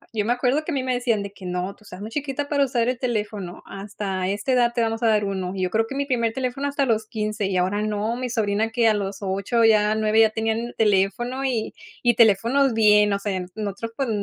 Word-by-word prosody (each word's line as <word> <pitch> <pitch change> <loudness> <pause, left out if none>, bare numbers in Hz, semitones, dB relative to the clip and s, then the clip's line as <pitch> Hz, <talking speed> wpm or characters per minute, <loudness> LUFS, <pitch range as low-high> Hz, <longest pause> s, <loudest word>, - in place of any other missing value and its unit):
yo 210 - 0
me 235 - +2
acuerdo 255 +5 +1
que 335 - -3
a - - -2
mí 265 - -1
me 255 -1 0
decían 235 -4 0
de 200 - -7
que: 190 - -12
"No, 180 +2 -3
tú - - -23
estás 195 -2 -11
muy 215 - -7
chiquita 285 +1 -3
para 285 -1 +2
usar 240 -2 0
el 255 -1 -2
teléfono, 210 -7 -3
hasta 195 -2 -4
esta 205 +6 -2
edad 240 -1 +3
te 235 - +1
vamos 225 +1 -1
a - - +4
dar 210 -2 +3
uno", 190 -2 -3
y 185 - -2
yo 180 - 0
creo 225 +1 +1
que 275 - -6
mi 280 0 -1
primer 235 -4 0
teléfono 265 +3 -2
hasta 280 -1 0
los 220 -2 0
15, 215 -2 -2
y 190 -1 -1
ahora 190 +3 0
no. 215 +2 -1
Mi 250 0 -4
sobrina 220 -1 0
que 230 -1 +2
a 220 - +5
los 200 -1 -3
8, 200 +4 0
ya 215 -1 +4
9, 220 0 +2
ya 220 - +6
tenían 225 +2 -2
teléfono 220 +6 +1
y 235 -4 -1 0.3
y 240 -1 +4
teléfonos 230 +5 +4
bien, 210 -2 +5
o - - +1
sea, 195 -3 -2
nosotros, 215 +2 -5
pues, 270 -4 -1
220 Hz, 250 wpm, -23 LUFS, 205-245 Hz, 0.3 s, ya